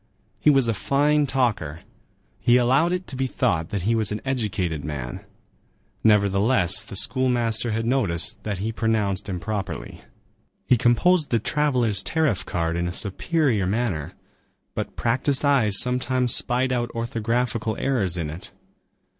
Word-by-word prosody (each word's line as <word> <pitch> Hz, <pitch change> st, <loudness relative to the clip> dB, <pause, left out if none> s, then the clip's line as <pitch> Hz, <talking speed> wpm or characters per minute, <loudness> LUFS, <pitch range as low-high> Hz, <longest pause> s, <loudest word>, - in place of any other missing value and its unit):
He -, -, +3 dB
was 135 Hz, -4 st, +4 dB
a 115 Hz, -, +1 dB
fine 145 Hz, +5 st, +1 dB
talker. 105 Hz, -, -1 dB, 0.6 s
He 120 Hz, +1 st, +4 dB
allowed 130 Hz, +8 st, +2 dB
it 180 Hz, 0 st, -2 dB
to 135 Hz, -, -9 dB
be 130 Hz, 0 st, -1 dB
thought 90 Hz, -11 st, -1 dB
that 100 Hz, -4 st, -3 dB
he 110 Hz, +4 st, +1 dB
was 110 Hz, -3 st, 0 dB
an 105 Hz, -, -3 dB
educated 100 Hz, -, -2 dB
man. 70 Hz, -4 st, -6 dB, 0.8 s
Nevertheless, 100 Hz, -1 st, +3 dB
the -, -, -9 dB
schoolmaster 120 Hz, -1 st, +2 dB
had 115 Hz, +1 st, -2 dB
noticed 110 Hz, -10 st, 0 dB
that 105 Hz, -3 st, -4 dB
he 105 Hz, +4 st, -3 dB
pronounced 110 Hz, -4 st, -1 dB
improperly.12 100 Hz, +2 st, -5 dB, 0.6 s
He 125 Hz, -, +4 dB
composed 140 Hz, +8 st, +2 dB
the 115 Hz, -, +2 dB
travellers' 120 Hz, -5 st, 0 dB
tariff 140 Hz, -, 0 dB
card 85 Hz, -1 st, -2 dB
in 85 Hz, 0 st, -1 dB
a 85 Hz, -, -4 dB
superior 110 Hz, -, 0 dB
manner, 95 Hz, -8 st, -2 dB, 0.6 s
but -, -, -5 dB
practised 130 Hz, +4 st, 0 dB
eyes 120 Hz, -8 st, +4 dB
sometimes 125 Hz, 0 st, +2 dB
spied 125 Hz, +2 st, +1 dB
out 120 Hz, -1 st, -1 dB
orthographical 115 Hz, -1 st, -2 dB
errors 100 Hz, -10 st, 0 dB
in 80 Hz, -3 st, -3 dB
it. 80 Hz, +4 st, -9 dB
115 Hz, 145 wpm, -23 LUFS, 100-130 Hz, 0.8 s, was